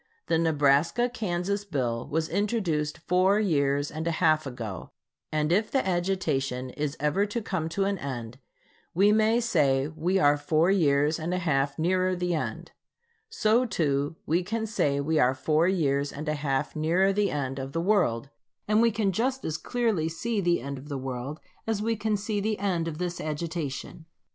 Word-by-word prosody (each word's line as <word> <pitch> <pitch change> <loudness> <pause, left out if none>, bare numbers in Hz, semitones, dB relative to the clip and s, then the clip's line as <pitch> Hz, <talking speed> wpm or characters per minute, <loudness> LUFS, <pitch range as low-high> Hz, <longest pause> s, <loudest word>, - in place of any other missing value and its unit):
The 165 - +1
Nebraska 160 - +2
Kansas 200 -2 -2
bill 125 -10 -2
was 160 +2 -1
introduced 190 -8 -1
four 185 +4 +2
years 145 -7 +1
and 160 +2 -4
a 165 - -1
half 155 -3 +3
ago, 115 -7 -6 0.4
and 155 0 0
if 210 +5 +2
the 265 -8 0
agitation 150 -9 -1
is 150 +2 -3
ever 150 +8 +1
to 205 +3 -2
come 185 -7 -3
to 195 +4 0
an 200 -1 -1
end, 125 -3 -6 0.6
we 200 +4 +5
may 220 +2 +3
say 140 - +2
we 165 +4 0
are 145 -5 +4
four 155 +4 +2
years 150 -3 +2
and 170 +3 -2
a - - 0
half 140 -5 0
nearer 185 +3 +1
the 180 0 -1
end. 160 - -4 0.6
So 235 - +2
too 145 - 0
we 170 +4 +2
can 220 +5 -2
say 145 -10 0
we 155 +2 +1
are 130 -1 +3
four 155 +5 +2
years 145 -6 +1
and 150 +3 -7
a 150 - +1
half 140 -1 -2
nearer 175 +6 +2
the 205 0 +1
end 135 -3 -3
of 135 0 -5
the 165 - -2
world; 165 - +1 0.4
and 215 +1 +4
we 235 - +5
can 210 -3 0
just 260 +7 -1
as 155 - -2
clearly 220 -10 0
see 210 +6 -2
the 175 -5 +1
end 140 +1 -5
of 145 +3 -12
the 140 - -3
world 130 +3 -5 0.3
as 220 -2 0
we 225 +2 0
can 215 0 0
see 205 +1 -2
the 215 +1 -1
end 180 -5 -1
of 155 -2 -4
this 175 0 -3
agitation. 155 -1 -4
165 Hz, 185 wpm, -27 LUFS, 145-200 Hz, 0.6 s, we